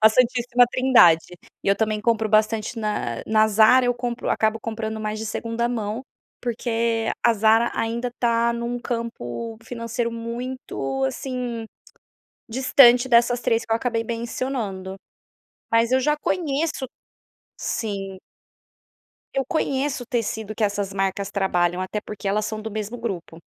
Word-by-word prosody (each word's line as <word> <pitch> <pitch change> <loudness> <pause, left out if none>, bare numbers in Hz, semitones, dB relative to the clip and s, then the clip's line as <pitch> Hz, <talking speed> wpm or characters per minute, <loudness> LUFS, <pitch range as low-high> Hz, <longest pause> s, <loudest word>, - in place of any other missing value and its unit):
A 220 - +10
Santíssima 245 +1 +3
Trindade 240 -12 +5 0.4
e - - +1
eu 200 - +4
também 215 0 0
compro 220 -1 +1
bastante 215 +2 +1
na 210 - -2
na 220 0 +4
Zara, 220 +4 +6
eu 245 - +2
compro 240 0 -4
acabo 220 0 +1
comprando 220 -1 -4
mais 215 0 -3
de 220 - -4
segunda 230 +2 -2
mão, 225 0 -3 0.4
porque 230 -1 -1 0.2
a 235 - +6
Zara 220 +2 +4
ainda 235 +2 -2
tá 235 0 +2
num 235 +1 -3
campo 230 - -4
financeiro 235 0 -3
muito, 230 - -4
assim, 240 - -3 0.9
distante 250 0 +6
dessas 240 0 +4
3 225 0 +1
que - - -8
eu - - +5
acabei 230 -1 -1
mencionando 230 -4 -4 0.8
mas 230 +1 +3
eu 260 - +4
já 300 +3 +2
conheço 300 -3 -1 0.7
Sim. 195 -3 -3 1.2
Eu 270 -1 +1
conheço 275 -3 -1
o - - -11
tecido 220 -2 -2
que 220 - +1
essas 200 -1 -1
marcas 195 0 -1
trabalham 180 -3 +1
até 185 +3 -3
porque 210 -1 -8
elas 210 +2 +1
são 215 0 -4
do 220 - -5
mesmo 215 +3 -4
grupo. 180 -7 -5
230 Hz, 145 wpm, -23 LUFS, 215-245 Hz, 1.2 s, A